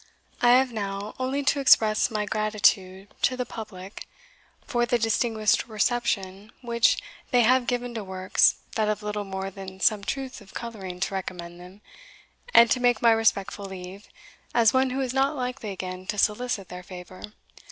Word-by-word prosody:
I 240 Hz, 0 st, +6 dB
have 255 Hz, -1 st, +3 dB
now 200 Hz, -1 st, -4 dB
only 265 Hz, +2 st, -1 dB
to 280 Hz, +1 st, +2 dB
express 220 Hz, -5 st, +4 dB
my 210 Hz, -2 st, -2 dB
gratitude 205 Hz, -2 st, 0 dB
to 255 Hz, -, +2 dB
the 250 Hz, -, -2 dB
Public 205 Hz, -4 st, -9 dB, 0.6 s
for 240 Hz, -1 st, 0 dB
the 240 Hz, -, +2 dB
distinguished 225 Hz, -1 st, +1 dB
reception 210 Hz, -3 st, -1 dB
which, 235 Hz, -1 st, +3 dB, 0.3 s
they 245 Hz, -, +4 dB
have 245 Hz, +1 st, +3 dB
given 245 Hz, -1 st, -2 dB
to 225 Hz, -2 st, -4 dB
works, 185 Hz, -1 st, +2 dB, 0.2 s
that 215 Hz, -1 st, 0 dB
have 210 Hz, 0 st, -2 dB
little 210 Hz, 0 st, -3 dB
more 190 Hz, 0 st, -5 dB
than 190 Hz, 0 st, -10 dB
some 210 Hz, +1 st, +2 dB
truth 265 Hz, +1 st, -4 dB
of 195 Hz, -, -17 dB
colouring 195 Hz, -6 st, -6 dB
to 190 Hz, -, -1 dB
recommend 175 Hz, -2 st, -6 dB
them, 180 Hz, +3 st, -14 dB, 0.7 s
and 235 Hz, -, +7 dB
to 255 Hz, -, +3 dB
take 245 Hz, -2 st, +3 dB
my 230 Hz, -, +7 dB
respectful 210 Hz, -3 st, +1 dB
leave, 190 Hz, +1 st, -9 dB, 0.5 s
as 230 Hz, -3 st, +5 dB
one 260 Hz, 0 st, +3 dB
who 260 Hz, +2 st, -2 dB
is 255 Hz, -2 st, -2 dB
not 275 Hz, +3 st, +1 dB
likely 250 Hz, -4 st, -4 dB
again 185 Hz, -1 st, -6 dB
to 210 Hz, -, -3 dB
solicit 210 Hz, -1 st, 0 dB
their 180 Hz, 0 st, -8 dB
favour. 180 Hz, 0 st, -11 dB
215 Hz, 170 wpm, -26 LUFS, 190-245 Hz, 0.7 s, and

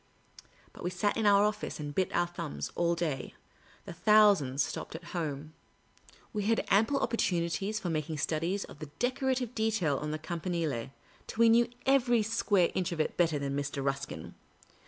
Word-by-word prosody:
But -, -, -11 dB
we 175 Hz, -, 0 dB
sat 185 Hz, +3 st, 0 dB
in 220 Hz, -2 st, +1 dB
our 200 Hz, 0 st, +6 dB
office 210 Hz, -4 st, -2 dB
and 145 Hz, -1 st, -5 dB
bit 185 Hz, +4 st, 0 dB
our 175 Hz, -, +2 dB
thumbs 170 Hz, -3 st, -5 dB
all 170 Hz, 0 st, +1 dB
day; 155 Hz, -6 st, -3 dB, 0.5 s
the -, -, -7 dB
thousands 200 Hz, -10 st, +4 dB
stopped -, -, -5 dB
at 165 Hz, -, -7 dB
home. 155 Hz, -3 st, -4 dB, 0.8 s
We 210 Hz, -2 st, -2 dB
had 225 Hz, +1 st, +1 dB
ample 220 Hz, +8 st, +3 dB
opportunities 195 Hz, 0 st, 0 dB
for 180 Hz, -6 st, -3 dB
making 155 Hz, 0 st, -2 dB
studies 165 Hz, +6 st, -1 dB
of -, -, -12 dB
fehe 155 Hz, -2 st, -7 dB
decorative 255 Hz, -1 st, 0 dB
detail 215 Hz, -, +1 dB
on 150 Hz, -, -4 dB
the 155 Hz, -, -2 dB
Campanile, 165 Hz, -6 st, -3 dB, 0.4 s
till -, -, -8 dB
we 230 Hz, 0 st, +7 dB
knew 235 Hz, +1 st, +5 dB, 0.2 s
every 245 Hz, -4 st, +4 dB
square 205 Hz, -4 st, +2 dB
inch 180 Hz, -2 st, -1 dB
of 170 Hz, -, -4 dB
it 155 Hz, -, 0 dB
better 165 Hz, -4 st, +2 dB
than 140 Hz, -1 st, -2 dB
Mr. 140 Hz, -1 st, -3 dB
Ruskin. 135 Hz, 0 st, -3 dB
175 Hz, 175 wpm, -30 LUFS, 155-215 Hz, 0.8 s, we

